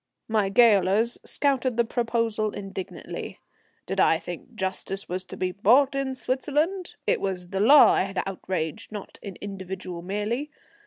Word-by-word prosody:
My 215 Hz, -3 st, +1 dB
gaolers 220 Hz, 0 st, +4 dB
scouted 265 Hz, -4 st, +1 dB
the 235 Hz, -, +3 dB
proposal 230 Hz, -2 st, -1 dB
indignantly. 195 Hz, -2 st, -7 dB, 0.5 s
Did -, -, -3 dB
I -, -, +5 dB
think 245 Hz, -, -9 dB
justice 190 Hz, 0 st, -3 dB
was 185 Hz, +1 st, -3 dB
to -, -, -9 dB
be 185 Hz, 0 st, -1 dB
bought 245 Hz, +9 st, +4 dB
in 275 Hz, -1 st, -2 dB
Switzerland? 300 Hz, +9 st, -1 dB
It -, -, +1 dB
was 180 Hz, -2 st, -3 dB
the 195 Hz, 0 st, -2 dB
law 275 Hz, +8 st, +8 dB
I -, -, +2 dB
had 195 Hz, 0 st, -3 dB
outraged, 190 Hz, +1 st, -4 dB
not 210 Hz, -2 st, -8 dB
an 200 Hz, -3 st, -7 dB
individual 190 Hz, -3 st, -6 dB
merely. 210 Hz, -, -2 dB
210 Hz, 150 wpm, -26 LUFS, 190-245 Hz, 0.5 s, law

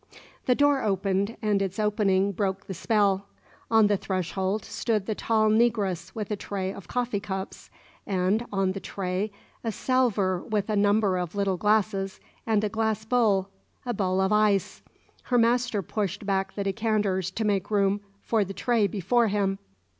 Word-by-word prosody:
The 250 Hz, -, +4 dB
door 285 Hz, -1 st, +3 dB
opened, 195 Hz, +1 st, 0 dB
and 205 Hz, -2 st, +2 dB
its 190 Hz, -1 st, -2 dB
opening 200 Hz, -2 st, +2 dB
broke 195 Hz, 0 st, -2 dB
the 190 Hz, -, -5 dB
spell. 200 Hz, 0 st, +1 dB, 0.4 s
On 225 Hz, -1 st, +5 dB
the 205 Hz, -1 st, +3 dB
threshold 190 Hz, +1 st, -2 dB
stood 215 Hz, -4 st, -1 dB
the 215 Hz, -, -1 dB
tall 215 Hz, 0 st, +2 dB
negress 205 Hz, -6 st, +1 dB
with 215 Hz, -2 st, -4 dB
a -, -, +1 dB
tray 195 Hz, -1 st, -4 dB
of 200 Hz, -5 st, -11 dB
coffee 245 Hz, -3 st, -1 dB
cups, 195 Hz, -2 st, -6 dB, 0.4 s
and 195 Hz, +3 st, +1 dB
on 195 Hz, -2 st, +1 dB
the 195 Hz, -, -5 dB
tray 190 Hz, +2 st, -3 dB, 0.3 s
a 225 Hz, -, -1 dB
salver 210 Hz, -7 st, +1 dB
with 215 Hz, 0 st, -2 dB
a -, -, +1 dB
number 205 Hz, -2 st, +3 dB
of 175 Hz, +1 st, -4 dB
little 200 Hz, -2 st, +1 dB
glasses 205 Hz, -1 st, +1 dB, 0.3 s
and 215 Hz, -2 st, +2 dB
a -, -, +2 dB
glass 220 Hz, 0 st, -1 dB
bowl 215 Hz, -5 st, +2 dB, 0.4 s
a 245 Hz, -, -1 dB
bowl 190 Hz, -2 st, 0 dB
of 190 Hz, +2 st, +2 dB
ice. 210 Hz, -2 st, +2 dB, 0.4 s
Her 250 Hz, -, +2 dB
master 235 Hz, -3 st, +2 dB
pushed 205 Hz, +2 st, -3 dB
back 195 Hz, -1 st, -1 dB
the 200 Hz, -, -2 dB
decanters 200 Hz, -3 st, 0 dB
to 220 Hz, +3 st, -3 dB
make 200 Hz, -2 st, 0 dB
room 200 Hz, -1 st, +2 dB, 0.2 s
for 225 Hz, -3 st, +2 dB
the 195 Hz, 0 st, -7 dB
tray 230 Hz, -4 st, +2 dB
before 210 Hz, +5 st, +1 dB
him. 195 Hz, -1 st, 0 dB
205 Hz, 170 wpm, -26 LUFS, 190-220 Hz, 0.4 s, On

